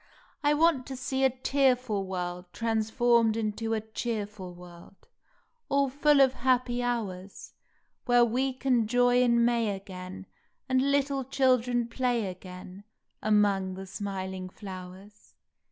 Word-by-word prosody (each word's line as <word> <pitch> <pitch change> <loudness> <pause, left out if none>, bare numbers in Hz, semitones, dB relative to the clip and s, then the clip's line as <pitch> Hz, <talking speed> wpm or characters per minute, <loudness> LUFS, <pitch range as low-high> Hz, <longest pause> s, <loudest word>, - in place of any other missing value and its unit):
I 295 +1 +3
want 310 -4 +2
to 270 - -5
see 265 +1 -2
a 265 - +6
tearful 255 -5 +1
world 180 -1 -5
Transformed 225 0 +2
into 225 +1 -2
a 220 - -2
cheerful 210 -4 -5
world, 175 +1 -14 0.7
All 280 -1 +2
full 290 +1 +4
of 265 -1 +5
happy 250 -1 +1
hours, 205 -6 -4 0.5
Where 245 -1 +5
we 255 +4 0
can 255 -4 +1
joy 245 +1 +3
in 235 -1 +4
May 230 -4 +1
again, 190 0 -9 0.4
And 260 +1 +2
little 280 -1 +1
children 250 -2 +1
play 240 -2 0
again 185 +1 -9 0.4
Among 200 -3 +2
the 190 +1 -7
smiling 190 -1 -5
flowers. 190 +1 -11
230 Hz, 125 wpm, -28 LUFS, 195-255 Hz, 0.7 s, a